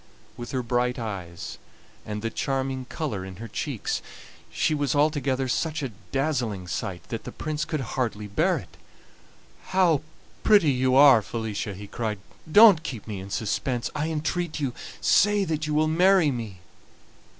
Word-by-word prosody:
With 120 0 -7
her 130 -2 -2
bright 125 +1 0
eyes, 95 -7 -6 0.5
and 105 0 -4
the 115 - -1
charming 135 0 -2
color 125 - -4
in 95 0 -8
her 115 +5 -8
cheeks, - - -3 0.5
she - - 0
was 145 -1 0
altogether 140 -3 +1
such 155 +4 -1
a 130 - -3 0.2
dazzling 120 -10 -1
sight 90 0 -4
that 115 -2 -4
the - - -7
Prince 155 -1 -3
could 155 -3 -2
hardly 115 -3 -2
bear 100 -1 +1
it. - - -11 0.9
"How 175 -6 +3 0.4
pretty 200 -9 +5
you 130 0 +2
are, 135 -4 +8
Felicia!" 105 -2 -4
he 100 +2 -8
cried. 105 +1 -3 0.3
"Don't 205 -4 +8
keep 125 -9 -6
me 105 -3 -5
in 95 +1 -8
suspense, 115 +4 -2
I 150 +2 -1
entreat 160 +2 -2
you; 135 -4 -1 0.3
say 205 0 +4
that 155 -2 -2
you 150 - -1
will 155 +1 +3
marry 175 0 +4
me." 110 -8 -6
130 Hz, 160 wpm, -26 LUFS, 110-155 Hz, 0.9 s, are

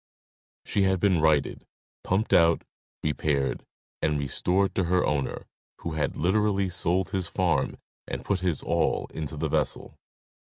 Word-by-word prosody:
She 100 - 0
had 95 -1 +2
been 95 -4 +3
righted, 75 -2 +2 0.4
pumped 100 +4 0
out, 85 -1 +5 0.4
repaired, 75 -3 0 0.4
and 75 -1 +1
restored 90 +8 +1
to 95 - 0
her 90 +1 +2
owner, 70 -3 -2 0.4
who 85 - -4
had 80 -1 -2
literally 100 +2 +2
sold 90 +2 0
his 95 -4 -1
farm - - 0 0.3
and - - -5
put 100 -2 0
his 90 -5 -1
all 85 -1 +1
into 80 -2 -5
the - - -1
vessel. - - -2
85 Hz, 140 wpm, -27 LUFS, 80-95 Hz, 0.4 s, out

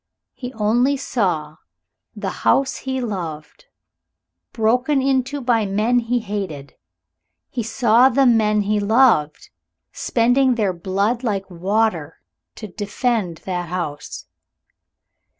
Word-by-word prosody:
He 250 -1 -7
only 240 +6 +1
saw 175 - -2 0.6
the - - -4
house 270 -1 +2
he 265 0 -3
loved 165 -10 -6 0.9
broken 250 +6 +1
into 270 +1 0
by 235 -4 +1
men 215 +5 +1
he 240 +1 -1
hated; 195 -10 -5 0.8
he 245 - -2
saw 235 +2 +4
the 270 +2 +3
men 215 -3 +3
he 210 +1 0
loved 205 - +2 0.4
spending 245 +2 +2
their 205 -5 0
blood 200 +7 -1
like 200 -5 -2
water 180 -3 -1 0.4
to 215 - -8
defend 205 -2 -2
that 180 -2 -3
house. 165 -5 -5
220 Hz, 110 wpm, -20 LUFS, 185-245 Hz, 0.9 s, saw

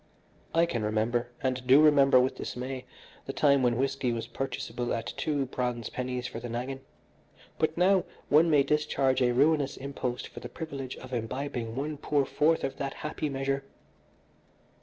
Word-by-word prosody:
"I 165 +1 +5
can 120 -9 -2
remember, 110 +3 0 0.2
and 130 -1 +1
I - - -11
do 130 +3 +6
remember 140 -4 +6
with 130 +1 +2
dismay, 130 +1 -5 0.4
the 135 - -3
time 140 -2 +4
when 120 -2 +2
whisky 135 -1 0
was 115 -1 -3
purchaseable 125 0 -4
at 115 0 -4
two 145 -3 0
bronze 125 -2 -3
pennies 125 -1 -3
for 115 - -5
the 120 +1 -6
naggin, 125 +3 -4 0.8
but 155 +1 +1
now 185 +1 +4 0.2
one 160 +3 +5
may 145 -3 +5
discharge 140 -2 +1
a 125 -1 +4
ruinous 145 +2 +2
impost 130 -2 -4
for - - -9
the - - -8
privilege 140 -5 -6
of 130 0 -10
imbibing 120 0 -3
one 145 +3 -3
poor 145 -1 +1
fourth 160 +4 +2
of 135 - -3
that 140 -1 -3
happy 150 0 -2
measure. 135 0 -1
135 Hz, 170 wpm, -29 LUFS, 125-145 Hz, 0.8 s, do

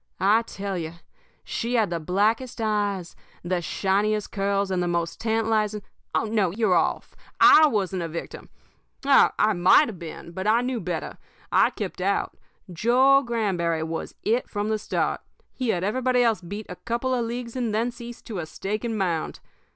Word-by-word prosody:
I 210 +4 +4
tell 200 -4 -5
you, 160 0 -5 0.5
she 235 +2 -2
had 220 -6 +2
the 170 - -1
blackest 210 +10 0
eyes, 205 -5 -1 0.3
the 175 0 -1
shiniest 205 +4 0
curls, 200 0 0
and 185 -1 0
the 175 - 0
most 170 -1 -2
tantalizing 220 -2 0 0.3
Oh, - - +2
no, 215 -4 +1
you're 205 +1 +1
off 170 - 0 0.2
I 310 0 +8
wasn't 195 -7 -1
a 170 - -2
victim. 165 +1 -7 0.6
I 240 -6 +4
might 185 +10 +5
have 195 -6 -9
been, 170 0 -8
but 190 +4 -4
I 225 +2 +4
knew 250 -1 -2
better. 175 -2 -4 0.3
I - - +5
kept - - -6
out. - - 0 0.4
Joe 255 +9 +4
Granberry 190 - -1
was 160 0 -5
It 235 +3 0
from 205 0 -2
the 215 -1 0
start. - - -1 0.3
He 255 -3 -3
had 180 -4 0
everybody 250 +4 +2
else 225 -5 +2
beat 205 +5 -7
a 180 - -8
couple 240 +3 -2
of 240 -2 0
leagues 235 0 -5
and 240 -3 -1
thence 235 +3 -2
east 240 0 -9
to 210 -5 -5
a 160 - -5
stake 210 +7 -4
and 230 -2 -2
mound. 175 -5 -2
210 Hz, 175 wpm, -25 LUFS, 180-235 Hz, 0.6 s, I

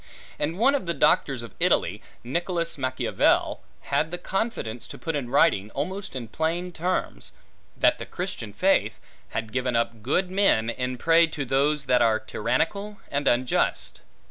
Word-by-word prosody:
And 155 +4 -1
one 260 +7 +4
of 270 -11 -1
the 170 - 0
doctors 135 -4 +2
of 115 - -10
Italy, - - +2 0.2
Nicholas 170 +5 -2
Machiavel, 130 -2 +1 0.2
had 145 +3 0
the 175 - -4
confidence 175 - -3
to - - -9
put 165 -2 -3
in 135 -4 -3
writing, 125 -7 +3
almost 190 +5 -4
in 120 -3 -5
plain 165 +8 -2
terms, 180 +2 -3 0.4
That - - +3
the - - -6
Christian - - -5
faith, - - +1 0.3
had 110 -1 -4
given 125 -1 0
up 115 -1 -1
good 180 - 0
men, 185 - +3
in 125 +1 -3
prey 165 +5 +5
to 150 -3 -4
those 140 +3 +1
that 125 -2 +3
are 110 -2 +3
tyrannical 200 - -2
and 140 0 -1
unjust. 125 +1 +1
145 Hz, 160 wpm, -25 LUFS, 125-175 Hz, 0.4 s, prey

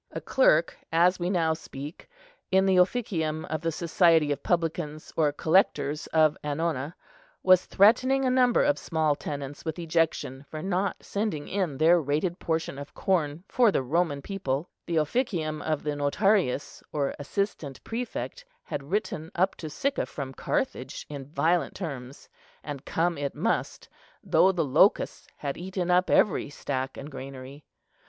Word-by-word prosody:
A - - -5
clerk, 170 -11 +3 0.2
as 175 +3 +4
we 175 +1 -1
now 165 -4 +2
speak, 150 -1 -9 0.4
in 190 0 +4
the 190 -1 +3
Officium 180 -6 +1
of 155 0 -3
the 165 0 0
society 165 -2 +3
of 145 - -2
publicans 165 -3 -2
or 155 -3 +3
collectors 155 -2 +1
of 155 -2 +3
annona 150 0 -2 0.5
was 185 -1 +6
threatening 255 +6 +4
a 255 - +2
number 250 -1 +4
of 290 - +2
small 160 -3 +1
tenants 145 0 -6
with 160 -1 -4
ejection 165 -5 0
for 155 0 -6
not 190 +1 -1
sending 200 -8 -2
in 185 -8 -1
their 165 +3 +5
rated 155 +5 -1
portion 160 -4 -2
of 140 - -9
corn 170 -4 0
for 240 -4 +4
the 135 - 0
Roman 145 0 0
people:—the 170 -2 -4
Officium 155 - 0
of 155 -2 -2
the 150 - -1
Notarius, 145 +1 +1
or 140 -2 -1
assistant 150 -4 -3
prefect, 245 - -5 0.2
had - - -4
written 185 -5 -2
up 185 +2 +2
to 155 - -6
Sicca 275 - -1
from 135 -2 -6
Carthage - - -3
in 140 -3 -7
violent 165 +1 +1
terms; 140 -7 -7 0.4
and 145 -2 -7
come 170 -1 0
it 140 -1 -3
must, - - -1 0.4
though 190 - +4
the 170 -4 0
locusts 150 +9 +3
had 140 -2 -4
eaten 180 0 -2
up 180 +1 +3
every 180 -7 +3
stack 135 -2 -4
and 145 +3 -8
granary. 135 +1 -9
160 Hz, 150 wpm, -27 LUFS, 145-185 Hz, 0.5 s, was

